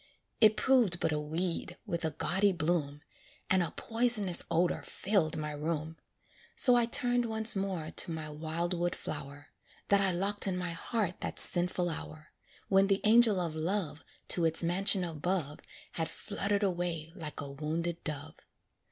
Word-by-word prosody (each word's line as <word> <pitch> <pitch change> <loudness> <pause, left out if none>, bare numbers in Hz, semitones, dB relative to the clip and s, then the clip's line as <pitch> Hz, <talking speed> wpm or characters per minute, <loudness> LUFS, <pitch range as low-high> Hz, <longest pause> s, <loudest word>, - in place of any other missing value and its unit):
It 215 -1 +5
proved 240 -10 +3
but 160 - 0
a 150 - -1
weed 170 +3 -3
with 170 0 -4
a 160 - +1
gaudy 185 +6 +1
bloom, 155 -3 -2 0.5
And 190 -1 +4
a 170 - 0
poisonous 225 -6 0
odor 170 +2 0
filled 185 -5 +1
my 150 -1 -4
room. 155 +1 -4 0.6
So 250 - +7
I 240 -1 +2
turned 245 -1 +2
once 220 0 +1
more 190 -5 -3
to - - +4
my 160 -1 -5
wildwood 170 +3 -3
flower, 145 0 -7 0.4
That 200 0 +4
I 195 - +2
locked 195 +3 0
in 185 -1 -1
my 180 -1 -3
heart 185 +2 -3
that - - -4
sinful 180 0 +2
hour, 155 -2 -7 0.4
When 195 0 +3
the 195 0 +1
angel 220 -2 +5
of 170 -3 -3
love, 160 -1 -3 0.3
To 175 - +4
its 165 +1 +5
mansion 185 +2 +3
above, 165 -2 -3 0.3
Had 165 -1 0
fluttered 205 0 -2
away 175 -4 -2
like 160 -5 -7
a 140 -1 -6
wounded 165 +4 -4
dove. 145 -2 -5
175 Hz, 160 wpm, -30 LUFS, 160-195 Hz, 0.6 s, So